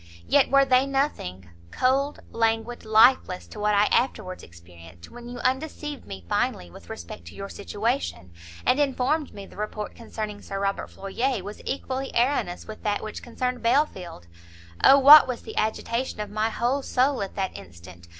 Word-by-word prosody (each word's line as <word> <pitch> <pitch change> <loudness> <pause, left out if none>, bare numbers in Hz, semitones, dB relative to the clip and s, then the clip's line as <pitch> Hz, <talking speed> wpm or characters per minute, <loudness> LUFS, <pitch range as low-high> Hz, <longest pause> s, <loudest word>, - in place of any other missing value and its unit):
yet 285 - +4
were 275 0 +5
they 260 0 +3
nothing, 270 - -2 0.2
cold, 270 - 0
languid, 225 +1 -1
lifeless 220 -3 +4
to 215 - -11
what 210 0 +2
I 205 - +5
afterwards 185 -7 0
experienced, 85 0 -15
when 240 0 -10
you 245 - -7
undeceived 295 +1 -3
me 95 -2 -8
finally 85 0 -1
with 85 - -14
respect 85 0 -8
to 85 - -11
your 195 0 -7
situation, 200 - -3 0.3
and 255 +3 +3
informed 285 +2 0
me 200 -1 -9
the - - -16
report 210 0 -4
concerning 215 -3 -6
Sir 195 -1 -5
Robert 195 0 -1
Floyer 215 +3 -2
was 205 +2 -8
equally 265 0 -3
erroneous 240 -7 0
with 215 - -9
that 205 -1 -1
which 215 - -6
concerned 250 0 -3
Belfield! 230 - 0 0.6
O 275 - +8
what 285 +2 +10
was 250 -2 -4
the - - -9
agitation 230 +3 -2
of 210 -1 -4
my 215 +1 0
whole 245 +5 0
soul 265 -1 +1
at 195 - -5
that 190 -1 -2
instant! 85 -1 -12
225 Hz, 170 wpm, -25 LUFS, 190-260 Hz, 0.6 s, what